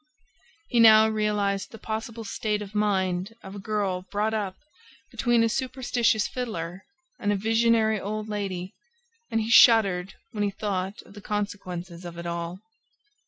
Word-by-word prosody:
He 240 - +2
now 220 -1 +8
realized 210 -2 0
the 225 - -11
possible 225 +1 -5
state 210 0 -2
of 200 0 -11
mind 195 -1 0
of 190 - -9
a 200 - -7
girl 195 -3 -1
brought 210 +2 0
up 200 -4 -2 0.6
between 240 -2 +2
a - - +3
superstitious 245 -3 0
fiddler 190 -7 -5 0.3
and 205 - 0
a - - +2
visionary 225 +1 +2
old 215 +2 -4
lady 195 -3 -4 0.6
and 225 - 0
he 220 +1 -2
shuddered 195 -6 +6 0.2
when 210 -3 -2
he 205 - +1
thought 195 -1 -3
of - - -17
the 205 - -11
consequences 185 -4 -4
of 170 -1 -8
it 170 - -7
all. 170 +2 -4
210 Hz, 155 wpm, -26 LUFS, 190-220 Hz, 0.6 s, now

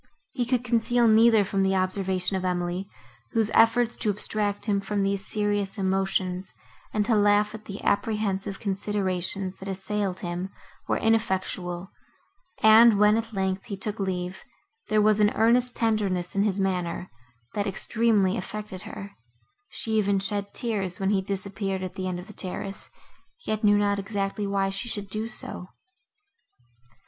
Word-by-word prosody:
He 250 -3 -1
could 250 -1 +1
conceal 240 0 +2
neither 220 -1 +6
from 195 0 -1
the 190 0 +2
observation 185 0 0
of 190 - -2
Emily, 180 +1 -2 0.4
whose 220 -2 +1
efforts 230 +1 +4
to 220 - -1
abstract 205 0 -1
him 205 -3 +1
from 200 0 -1
these 195 +1 0
serious 205 -1 0
emotions, 190 -1 -1 0.4
and 210 -1 0
to 230 - +2
laugh 205 0 +3
at 220 -1 -9
the 200 0 -7
apprehensive 200 -2 0
considerations, 190 -2 0
that 190 - -8
assailed 195 0 -2
him, 175 +1 -3 0.4
were - - +1
ineffectual; 190 -4 -1 0.7
and, 220 0 +8
when, 210 +1 +5
at 225 0 -2
length, 190 -2 -2
he 200 -4 -5
took 210 +1 -4
leave, 185 -1 -3 0.4
there 215 - +2
was 215 0 +4
an 210 -1 +5
earnest 240 +2 +3
tenderness 200 -6 0
in 200 - +1
his 205 -1 +1
manner, 180 -2 -2 0.4
that 205 -1 -1
extremely 205 0 +1
affected 210 -4 -6
her; 200 +1 -8 0.6
she 225 - -4
even 200 -1 +2
shed 200 +1 -2
tears, 195 -6 -2
when 195 0 +1
he 195 -2 +2
disappeared 195 0 -3
at 185 - -5
the 185 -1 -4
end 180 -1 -2
of 180 - -9
the 210 - -11
terrace, 195 +1 -5 0.6
yet 215 0 -2
knew 205 0 +5
not 205 -1 +1
exactly 200 0 -2
why 195 -1 0
she 195 +5 -3
should 200 -3 -4
do 215 +2 -3
so. 215 -5 -5
200 Hz, 155 wpm, -26 LUFS, 190-215 Hz, 0.7 s, and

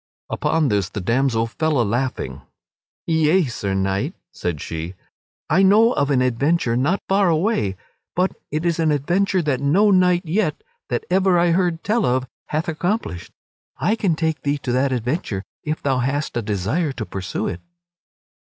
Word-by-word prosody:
Upon 160 -4 +1
this 100 -3 0
the 105 - -5
damsel 115 +3 +1
fell 150 +4 0
a - - +4
laughing: 115 - -2 0.6
"Yea, 160 +2 +3
Sir 100 -6 -3
Knight," 95 0 -1 0.2
said 85 -4 -3
she, 80 +5 -5 0.5
"I 175 +5 +3
know 215 +5 +5
of 140 - 0
an 130 -3 +3
adventure 130 +1 +1
not 145 +11 +1
far 195 -1 +3
away, 160 - +1 0.4
but 185 +2 +2 0.2
it 155 +3 -2
is 170 -1 +1
an 160 -1 +2
adventure 175 +6 +1
that 140 -4 0
no 190 +9 +4
knight 180 -1 +3
yet 170 -2 0 0.3
that 120 - -2
ever 190 -1 +4
I 170 0 +3
heard 170 -2 +1
tell 220 +2 +1
of 130 +1 0 0.2
hath 155 +4 -2
accomplished. 160 - -2 0.5
I 205 +7 +1
can 195 -7 +1
take 160 -1 -1
thee 145 0 0
to 125 - -1
that 130 +2 +2
adventure 120 - -2 0.2
if 155 +1 -3
thou 135 -2 +1
hast 140 +4 -1
a 120 - 0
desire 110 - -1
to 115 -4 -5
pursue 95 0 -4
it." 85 - -4
150 Hz, 170 wpm, -21 LUFS, 120-175 Hz, 0.6 s, know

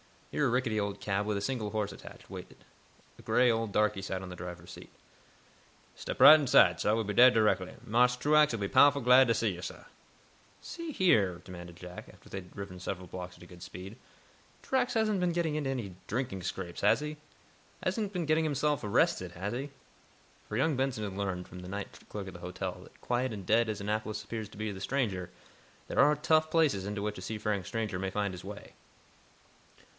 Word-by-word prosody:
Here 145 - +1
a - - +1
rickety 120 -3 0
old 100 -1 -2
cab 100 0 -1
with 105 0 -1
a 100 - -2
single 110 -3 -2
horse 105 -2 -1
attached, - - -12
waited. - - -10 0.6
A - - -11
gray 125 0 +3
old 115 -2 -1
darkey 105 -2 +2
sat 95 -1 -4
on 95 - -7
the 90 - -7
driver's 90 -1 -8
seat. - - -11 1.0
"Step - - -6
right 155 +1 +11
inside, 105 - +5
sah. 105 - +2
We'll 115 - 0
be 105 0 -3
dere 125 +5 +8
direckly. 105 -5 +1
Marse 125 +2 +3
Truax'll 150 -1 +3
be 100 -2 -2
powahful 140 -2 +5
glad 125 +2 +7
to 115 - +3
see 110 0 +1
yo', 90 - -8
sah." - - -7 0.8
"See 335 -2 -6
here," 100 - +3
demanded 85 -2 -10
Jack, 90 +1 -10
after - - -19
they - - -6
had 90 -2 -9
driven 100 -2 -7
several 90 0 -5
blocks 90 0 -7
at - - -15
a - - -11
good 90 0 -14
speed, 95 +6 -9 0.7
"Truax 260 -1 +1
hasn't 215 -3 +1
been 180 -1 +1
getting 165 -3 0
into 145 -3 -1
any 115 -9 -4
drinking 115 -5 -3
scrapes, 90 -1 -5
has 105 +7 +4
he? 150 0 -5 0.7
Hasn't 210 -3 -1
been 175 -3 -1
getting 155 +1 +2
himself 150 -1 0
arrested, 95 -3 +1
has 95 +4 -4
he?" 135 +4 -4 0.8
For 105 - -3
young 140 +2 +2
Benson 130 -5 -1
had 100 -2 -4
learned, 95 -2 -3
from 90 - -10
the 90 - -9
night 100 +1 -6
clerk 100 -2 -6
at 95 - -8
the 90 - -10
hotel, 90 +1 -5
that, - - -20
quiet 125 0 -1
and 100 -3 -7
"dead" 110 +3 +3
as 105 -2 -3
Annapolis 110 +1 -2
appears 110 -2 -5
to 105 - -15
the 105 -2 -4
stranger, 100 -7 -1 0.6
there - - -1
are 150 +2 +6
"tough" 155 +1 +2
places 150 - +2
into 105 0 -3
which 105 0 -3
a - - -7
seafaring 105 -1 -2
stranger 105 -3 -3
may 95 0 -2
find 100 0 -2
his 90 0 -9
way. 105 +1 -9
105 Hz, 205 wpm, -31 LUFS, 95-130 Hz, 1.0 s, right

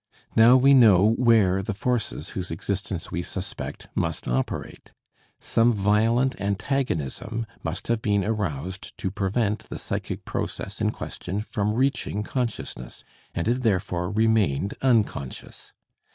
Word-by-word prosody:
Now 115 +3 +8
we 135 +2 +6
know 110 -5 +7
where 110 -6 +4
the 105 +1 -4
forces 120 +2 -1
whose 90 -1 -4
existence 95 +1 -3
we 85 - -1
suspect 85 -7 -6
must - - -2
operate. 65 +2 -3 0.5
Some 115 +1 +3
violent 115 +5 +2
antagonism 105 - -2 0.2
must 80 +2 -4
have 115 -1 +1
been 100 -2 +1
aroused 95 -4 -3
to 95 - -2
prevent 100 +2 -1
the - - -5
psychic - - -4
process - - -4
in - - +3
question 100 +4 -4
from 105 -1 -1
reaching 130 -5 0
consciousness, 115 - -4 0.3
and 85 - -1
it 125 +2 +1
therefore 90 -5 0
remained 105 -5 +2
unconscious. 110 - -1
105 Hz, 125 wpm, -25 LUFS, 95-115 Hz, 0.5 s, Now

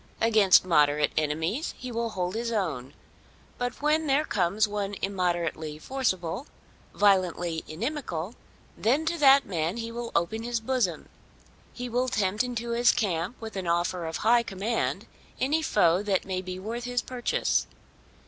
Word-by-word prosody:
Against 215 -5 +5
moderate 150 -3 +3
enemies 160 - -1
he 250 - -7
will 230 0 -1
hold 180 -3 -3
his 230 +1 -2
own. 160 - -2 0.6
But 245 +3 -3
when 310 +1 +2
there 285 +3 +2
comes 200 - +1
one 205 -1 -3
immoderately 175 -5 -1
forcible, 205 - -2 0.5
violently 180 -5 +2
inimical, 205 - -4 0.4
then 275 +8 +1
to 335 +1 -1
that 275 -1 +7
man 170 +1 -2
he 230 0 -4
will 235 0 -5
open 205 +7 0
his 235 0 -2
bosom. 225 -8 -1 0.6
He 245 0 -6
will 245 +2 0
tempt 205 0 +1
into 235 -1 -4
his 240 +1 +4
camp 195 -2 -2
with 220 -2 -8
an 190 -2 -4
offer 175 0 0
of 160 - -3
high 235 +2 +4
command 220 +1 -2 0.3
any 295 +5 +1
foe 180 - +3
that 200 -3 0
may 185 -1 -2
be 185 0 -6
worth 230 +5 -5
his 245 -1 -1
purchase. 250 -2 0
210 Hz, 150 wpm, -27 LUFS, 175-240 Hz, 0.6 s, that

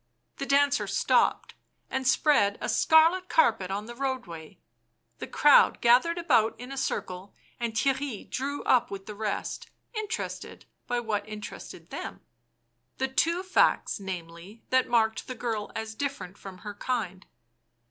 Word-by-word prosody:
The 275 - -4
dancer 285 0 +3
stopped - - +1 0.3
and 265 -1 -2
spread 255 -7 +3
a - - -3
scarlet 330 +4 +4
carpet 220 - +3
on 200 +2 -3
the 240 - -8
roadway; 240 - -5 0.6
the - - -5
crowd 295 -1 +5
gathered 255 +9 +4
about 225 -12 +2
in 250 +2 -8
a - - -5
circle, 185 -7 -4 0.2
and 235 -2 -3
Theirry 265 -1 -1
drew 280 +3 -3
up 245 -1 +3
with 195 -1 -7
the 215 - -7
rest, 210 0 -4 0.2
interested 435 -1 -5 0.2
by 245 0 0
what 215 -2 -3
interested 210 -1 -9
them - - -6 0.4
— 115 +1 -48
the 265 - 0
two 335 +7 +1
facts, 370 - +2
namely, 185 +2 -8
that 260 0 +3
marked 220 -3 +1
the 255 - -5
girl 225 -3 -3
as 220 0 -4
different 220 -7 -4
from 190 -2 -10
her 210 - -5
kind. 205 -4 -3
235 Hz, 145 wpm, -28 LUFS, 200-275 Hz, 0.6 s, crowd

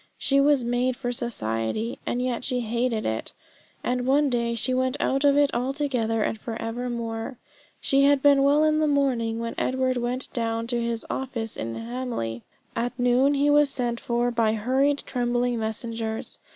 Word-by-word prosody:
She 275 0 +2
was 285 -2 +4
made 245 +1 0
for 245 -3 -2
society; 215 - -2
and 245 +1 0
yet 250 -1 -2
she 250 -1 0
hated 235 0 -1
it. 110 0 -2 0.5
And 250 0 -1
one 280 +1 +3
day 235 -1 0
she 250 +3 +1
went 260 +1 0
out 270 +1 +1
of 285 0 +5
it 290 -1 +3
altogether 250 -4 0
and 220 - -2
for 225 -1 -5
evermore. 230 +1 -4 0.4
She 275 0 +3
had 280 -1 +3
been 285 -1 +6
well 285 +2 +4
in 310 0 +3
the 310 - +2
morning 255 -6 +1
when 230 0 -3
Edward 255 0 0
went 245 +2 0
down 230 -1 -1
to 240 - +1
his 235 -1 -2
office 235 -4 -3
in 115 0 -4
Hamley. 230 - -4 0.3
At 245 +1 -2
noon 250 +3 +3
he 285 +1 +3
was 295 -1 +5
sent 240 -3 -2
for 240 0 0
by 225 -2 +2
hurried 265 +6 +1
trembling 245 -1 0
messengers. 220 0 -4
245 Hz, 175 wpm, -25 LUFS, 230-270 Hz, 0.5 s, been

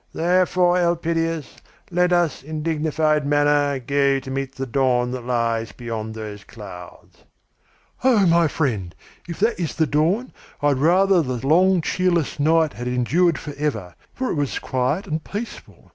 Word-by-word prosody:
Therefore, 180 +1 +2
Elpidias, 165 -2 -1 0.3
let 180 +1 +2
us 175 -4 +1
in 155 +2 -6
dignified 155 -1 +1
manner 145 0 +2
go 140 +2 +1
to 130 0 -9
meet 135 0 -4
the 135 - -4
dawn 125 -1 +1
that 125 -1 -6
lies 115 -2 -1
beyond 110 -2 -6
those 105 -2 -7
clouds." 95 -5 -12 0.9
"Oh, 235 -7 +4
my 170 -1 +4
friend! 110 - -2 0.3
If 170 - -6
that 225 0 +1
is 170 -4 -3
the 160 - +2
dawn, 165 +12 0 0.3
I 145 - +2
would 135 -2 +1
rather 185 +4 +4
the 125 -4 -4
long 180 +4 +4
cheerless 175 -3 0
night 160 +1 +3
had 120 +1 -6
endured 145 +7 +2
forever, 140 - -4 0.2
for 260 0 -3
it - - -2
was 145 -3 -1
quiet 130 +9 -1
and 155 0 -3
peaceful. 215 +4 -8
150 Hz, 155 wpm, -22 LUFS, 125-170 Hz, 0.9 s, Oh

